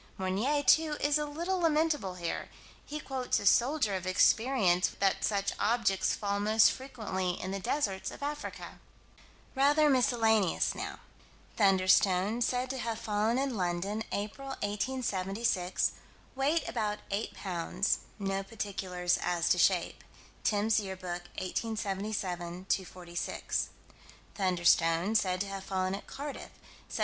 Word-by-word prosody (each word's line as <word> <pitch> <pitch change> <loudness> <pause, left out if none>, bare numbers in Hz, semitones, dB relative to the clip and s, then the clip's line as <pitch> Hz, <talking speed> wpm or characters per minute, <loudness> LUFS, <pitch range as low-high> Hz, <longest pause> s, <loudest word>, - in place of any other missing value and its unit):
Meunier, 210 +11 0
too, 310 0 +4
is 290 +1 +2
a 300 - -2
little 340 +6 -2
lamentable 305 - +1
here: 170 -2 -4 0.4
he 300 +1 -4
quotes 265 -3 -1
a - - -6
soldier 240 +1 +3
of 185 -1 -3
experience 185 -1 +3
that 195 -1 +2
such 200 -2 0
objects 210 -4 +2
fall 200 -1 -1
most 215 +2 +5
frequently 205 -9 -3
in 185 - -4
the 195 - -3
deserts 195 -2 -1
of - - -9
Africa. 295 +1 -5 0.7
Rather 290 +2 +4
miscellaneous 225 -7 +2
now: - - -6 0.5
"Thunderstone" 195 +2 +3
said 250 +1 +1
to 265 - -4
have 230 -2 -2
fallen 215 +3 0
in 270 -2 -1
London, 190 +3 -1
April, 210 +7 -4 0.2
1876: 205 -3 -1 0.4
weight 285 +5 +1
about 210 -3 -1
8 205 +3 -2
pounds: 180 +1 -1 0.2
no 195 -1 -1
particulars 190 -3 -2
as 175 -1 0
to 180 - +3
shape 180 -1 +2 0.4
(Timb's 210 +1 +2
Year 190 -2 -5
Book, 175 -1 -6
1877 190 -3 -3
246). 175 -2 -2 0.6
"Thunderstone" 175 0 +2
said 185 -4 +2
to 200 - -2
have 195 -1 -6
fallen 185 -1 -1
at 195 - -6
Cardiff, 285 +1 -6 0.4
Sept. - - -4
205 Hz, 130 wpm, -31 LUFS, 185-250 Hz, 0.7 s, most